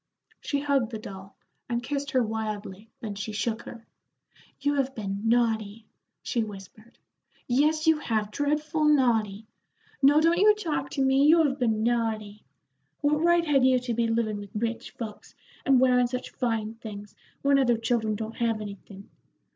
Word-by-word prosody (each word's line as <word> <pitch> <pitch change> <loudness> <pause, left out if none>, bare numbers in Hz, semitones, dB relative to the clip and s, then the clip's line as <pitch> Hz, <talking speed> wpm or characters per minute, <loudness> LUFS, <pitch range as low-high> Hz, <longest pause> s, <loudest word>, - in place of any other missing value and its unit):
She 285 -1 -2
hugged 280 -5 +1
the 225 - -5
doll, 195 -2 -10 0.3
and 240 0 -1
kissed 280 +3 -3
her 260 -2 +2
wildly, 215 -2 -5
then 215 -3 -4
she 205 +2 -5
shook 225 +2 -2
her. 230 -1 -10 0.7
"You 285 +1 +1
have 270 -1 -1
been 200 -2 -4
naughty," 225 -2 0 0.4
she 235 -3 -1
whispered 215 +2 -11 0.5
"yes, 305 +5 +2
you 320 -1 +4
have, 215 -6 -1
dreadful 300 +3 0
naughty. 225 -8 +2 0.6
No, 285 +2 +6
don't 335 +2 +3
you 420 +1 +6
talk 300 -10 -3
to 275 - -1
me; 265 +1 +4
you 325 +1 +6
have 285 -2 0
been 220 -3 +1
naughty. 220 -3 -1 0.6
What 300 +1 +2
right 345 0 +3
had 280 -4 +3
you 260 0 +5
to 245 -1 -3
be 230 0 +1
livin' 225 -2 -1
with 205 0 -11
rich 230 +2 -3
folks, 220 -3 -9 0.3
and 270 -2 +5
wearin' 250 -1 +4
such 250 +1 -5
fine 225 -3 -2
things, 210 -3 -9 0.3
when 280 0 +4
other 240 -3 +3
children 225 -2 0
don't 220 +1 -6
have 230 -2 0
anything. 200 -1 -9
235 Hz, 165 wpm, -27 LUFS, 215-275 Hz, 0.7 s, No